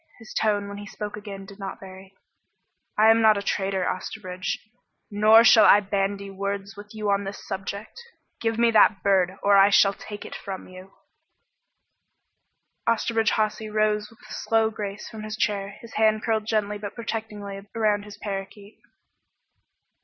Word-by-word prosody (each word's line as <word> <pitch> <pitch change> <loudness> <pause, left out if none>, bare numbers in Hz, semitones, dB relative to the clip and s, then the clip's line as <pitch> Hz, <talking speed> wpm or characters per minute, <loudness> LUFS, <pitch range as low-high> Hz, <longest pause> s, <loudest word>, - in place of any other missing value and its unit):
His 225 -2 -12
tone, 205 -2 +1
when 200 0 -7
he 205 - -9
spoke 210 +1 -6
again, 200 -2 -8
did 200 +1 -13
not 195 -1 -6
vary. 190 0 -12 0.8
"I 220 +1 +7
am 225 0 +4
not 215 -1 +5
a 200 - -3
trader, 195 -2 -1
Osterbridge. 185 -1 -4 0.5
Nor 215 +2 +6
shall 220 -1 +7
I 205 - +8
bandy 200 0 -2
words 200 +1 -4
with 205 +1 -12
you 210 -1 -1
on 200 0 +1
this 195 +1 -8
subject. 200 - -6 0.4
Give 225 -1 -1
me 235 0 +4
that 210 -2 +4
bird, 190 -1 +2
or 200 0 +5
I 195 +1 +7
shall 200 -1 +5
take 205 +1 -9
it - - -8
from 190 -1 -7
you!" 185 +1 -13 2.0
Osterbridge 230 -1 +1
Hawsey 215 0 -1
rose 210 0 0
with 225 - -20
a 215 - -9
slow 225 0 +1
grace 205 -1 -6
from 220 -2 -9
his 215 0 -6
chair, 200 -1 -1
his 230 - -12
hand 215 0 +2
curled 220 -2 0
gently 210 -1 -1
but 205 0 -7
protectingly 210 -3 -5
around 210 -2 +2
his 205 0 -11
parakeet. 200 +1 -7
205 Hz, 165 wpm, -25 LUFS, 195-215 Hz, 2.0 s, I